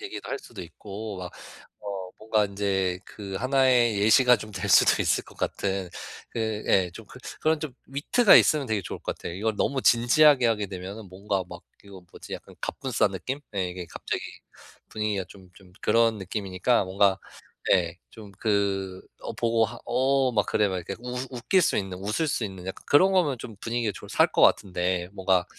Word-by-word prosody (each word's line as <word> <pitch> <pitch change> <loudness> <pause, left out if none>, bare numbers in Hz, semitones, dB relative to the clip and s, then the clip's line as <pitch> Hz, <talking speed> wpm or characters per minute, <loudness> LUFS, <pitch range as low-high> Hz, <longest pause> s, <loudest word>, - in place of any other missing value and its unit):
얘기도 405 -1 -7
할 140 - -2
수도 110 -8 -10
있고 100 +4 -8
막 90 -1 -6 0.5
어 100 -3 -6
뭔가 110 -1 +1
인제 95 -2 -1
그 100 -2 -9
하나의 130 -3 +3
예시가 125 +4 +6
좀 110 0 -9
될 95 -2 -4
수도 - - +6
있을 - - +1
것 - - -17
같은 95 -2 -2 0.4
그 - - -6 0.3
예 95 -2 +3
좀 115 - -11
그 - - -13 0.2
그런 155 0 +1
좀 155 -4 -5 0.2
위트가 155 - +4
있으면 150 -3 +4
되게 110 -3 0
좋을 - - -6
것 - - -4
같아요. 85 - -7
이걸 110 +4 -1
너무 135 +5 0
진지하게 130 +3 +5
하게 105 -2 0
되면은 95 +2 -8
뭔가 95 0 -2
막 85 -1 -9 0.2
이거 100 -2 -12
뭐지 - - -12
약간 - - -8
갑분싸 - - 0
느낌? 135 +2 -4
네 95 -3 -1
이게 90 0 -6
갑자기 - - -4 0.7
분위기가 105 -3 -2
좀 95 -1 -16
좀 95 -1 -18
그런 115 -1 +3
느낌이니까 100 +3 0
뭔가 95 +1 +2 0.5
예 85 -3 +2 0.2
좀 110 -3 -12
그 100 -3 0 0.2
어 - - -5
보고 115 -1 +1
하 120 +1 -6
어 130 +2 +2
막 105 -3 +2
그래 105 -1 +2
막 95 - -2
이렇게 90 +2 -5
웃 125 +1 -5
웃길 130 +9 +1
수 - - +1
있는 95 -2 -4
웃을 105 - -1
수 125 - -1
있는 95 -3 -7
약간 95 - -7
그런 185 +7 +6
거면 170 -8 +2
좀 115 -2 -9
분위기가 115 -1 -1
좀 - - -10
살 - - +4
것 - - +2
같은데 90 -1 +2
뭔가 95 -2 +2
105 Hz, 340 characters per minute, -26 LUFS, 95-120 Hz, 0.7 s, 예시가